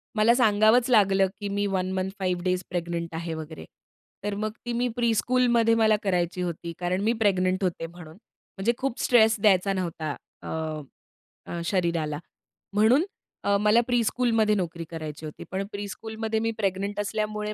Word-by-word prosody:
मला 220 +2 +5
सांगावंच 225 +1 +4
लागलं, 195 -4 +4
की 205 - -3
मी 205 +1 0
1 185 -1 -1
मंथ, 190 0 -1
5 180 -2 -1
डेज 185 0 0
प्रेग्नंट 170 -1 -3
आहे 165 0 -3
वगैरे. 160 0 -7 0.6
तर 205 0 -2
मग 215 0 -1
ती 240 - -2
मी 245 +1 +1
प्रीस्कूलमध्ये 235 0 +3
मला 220 -1 +4
करायची 180 -2 0
होती 170 -1 -4
कारण 180 +1 -1
मी 225 +2 +3
प्रेग्नंट 185 -2 +2
होते 170 -2 -1
म्हणून, 165 -2 -12 0.4
म्हणजे 210 +5 +1
खूप 265 -2 -3
स्ट्रेस 225 -2 +5
द्यायचा 195 -1 +4
नव्हता 170 -5 -3 0.3
अ, - - -6 1.0
अ, 170 - -3
शरीराला. 170 -5 0 0.5
म्हणून 225 - +4 0.4
अ, 200 - +3
मला 210 +3 +5
प्रीस्कूलमध्ये 230 -2 +2
नोकरी 170 -3 -3
करायची 155 -2 -6
होती, 150 - -8
पण 190 +1 -2
प्रीस्कूलमध्ये 220 +2 -4
मी 225 +1 0
प्रेग्नंट 200 0 -1
असल्यामुळे 210 0 -2
200 Hz, 155 wpm, -26 LUFS, 175-220 Hz, 1.0 s, मला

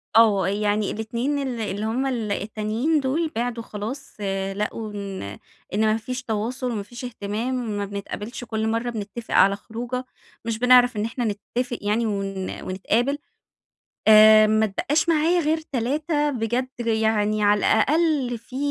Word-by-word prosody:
آه 210 -5 +5
يعني 205 +1 0
ال2 235 +6 -2
ال 260 -4 -3
اللي 205 0 -3
هُما 255 +5 0
ال 225 -5 -2
التانيين 220 +9 0
دول 305 +4 -1
بعدوا 235 0 -2
خلاص، 225 +6 -7 0.4
لقوا 210 +1 -3
إن 200 -2 -5 0.5
إن 210 - +1
ما 215 0 +3
فيش 250 +3 -5
تواصل 245 +3 -2
وما 210 -3 -3
فيش 240 +5 -9
اهتمام، 235 +2 -3
ما 205 - -1
بنتقابلش، 205 +4 -6
كل 220 -1 -2
مرة 230 +2 -1
بنتفق 225 0 -6
على 195 +1 +5
خروجة 240 +4 -5 0.4
مش 230 -1 -2
بنعرف 250 -1 +5
إن 210 - 0
إحنا 240 +1 -3 0.3
نتفق 245 -1 -1
يعني 215 +3 +1
ون 195 -2 -3
ونتقابل، 230 +9 0 0.9
آآ 215 0 +9
ما 215 +1 +3
اتبقاش 295 - 0
معايا 330 +2 +3
غير 315 0 +1
3 295 +4 0
بجد، 245 +1 -1
يعني 220 -2 +1
على 205 0 +4
الأقل 290 -2 +2
في 250 +3 -11
230 Hz, 150 wpm, -24 LUFS, 210-255 Hz, 0.9 s, آآ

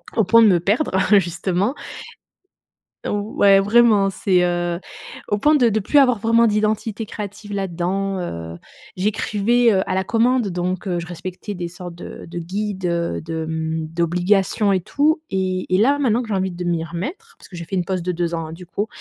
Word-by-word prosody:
au 225 - +3
point 230 +4 +5
de - - +7
me 180 -4 +4
perdre 210 - 0 0.3
justement. 180 +5 -1 1.3
Ouais, 205 -1 +3
vraiment, 210 -1 +4
c'est, 185 -1 +1
heu, 175 -1 -1 0.5
au 205 - 0
point 300 +8 +4
de 245 -6 +4
de 220 +1 0
plus 290 +9 +3
avoir 250 -4 +4
vraiment 230 +2 +3
d'identité 215 +1 -1
créative 205 0 -7
là-dedans. 195 +1 -2
Heu, 85 - -6 0.4
j'écrivais, 215 +4 +1
heu, 190 -1 +2
à - - 0
la 190 - 0
commande 235 +1 +2
donc, 180 +2 -3
heu, 180 -2 -1
je 170 - -7
respectais 180 +4 -7
des 175 -2 -4
sortes 175 0 -9
de 170 - -10
de 175 +1 -6
guides, 195 +3 -4
de 170 -1 -1
de 160 0 -4
mmh, 160 0 -3
d'obligations 180 +5 +1
et 185 - +1
tout 310 - +1
et 185 -1 -1
et - - +4
là, 275 +7 +3
maintenant 245 -5 +2
que 240 - -6
j'ai 210 - -1
envie 190 0 0
de 175 0 -7
m'y 170 -2 -1
remettre 290 - -7
parce - - -16
que 180 - -10
j'ai 170 - -6
fait 165 - -7
une 180 -2 -1
pause 185 -2 -2
de 180 +1 -2
2 170 0 -2
ans, 165 -1 -3
hein, - - -9
du 175 +2 -10
coup. 200 +5 -3
190 Hz, 200 wpm, -21 LUFS, 175-215 Hz, 1.3 s, de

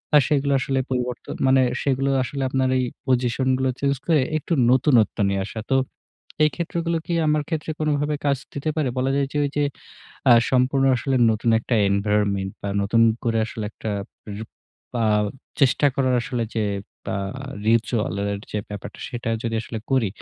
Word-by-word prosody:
আ - - +10
সেগুলো 140 -1 +2
আসলে 135 +1 0
পরিবর্তন 125 -1 -3
মানে 130 0 +5 0.2
সেগুলো 135 0 +1
আসলে 135 +1 -3
আপনার 130 0 +1
এই - - +1 0.2
পজিশন 125 0 +1
গুলো 130 0 +1
চেঞ্জ 140 0 +1
করে 160 -3 +4 0.2
একটু 160 - -3 0.2
নতুনত্ব 130 -5 +3
নিয়ে 100 0 0
আসা। 110 +2 -6
তো 135 - +5 0.7
এই 155 - +5
ক্ষেত্রগুলো 170 0 -1
কি 175 - -1
আমার 150 0 +2
ক্ষেত্রে 160 -1 -2
কোনভাবে 150 -1 0
কাজ 140 -2 +2 0.2
দিতে 145 +2 -2
পারে? 150 -4 +1
বলা 130 +1 +1
যায় 140 -1 +1 0.2
ওই 145 - 0
যে 145 - +3 0.7
আ - - +10 0.2
সম্পূর্ণ 130 +1 +3
আসলে 135 +2 0
নতুন 110 +2 +1
একটা 120 - -2
এনভায়রনমেন্ট 100 -1 +1
বা 100 - -3
নতুন 115 +3 +3 0.2
করে 115 -1 +1
আসলে 110 -2 -5 0.8
উপ - - -21 0.5
বা 115 -2 +1 0.6
চেষ্টা 135 +1 +4
করার 130 -2 +2
আসলে 120 -1 -2
যে 110 - +1 0.5
আ - - -1 0.5
ritual 115 -2 +1
এর 100 - -1 0.2
আ - - -28
যে 105 - -1
ব্যাপারটা 105 -1 -8
সেটা 120 -2 -4
যদি 115 -1 -2
আসলে 115 - -6
করি। 130 -6 +3
130 Hz, 170 wpm, -23 LUFS, 115-140 Hz, 0.8 s, আ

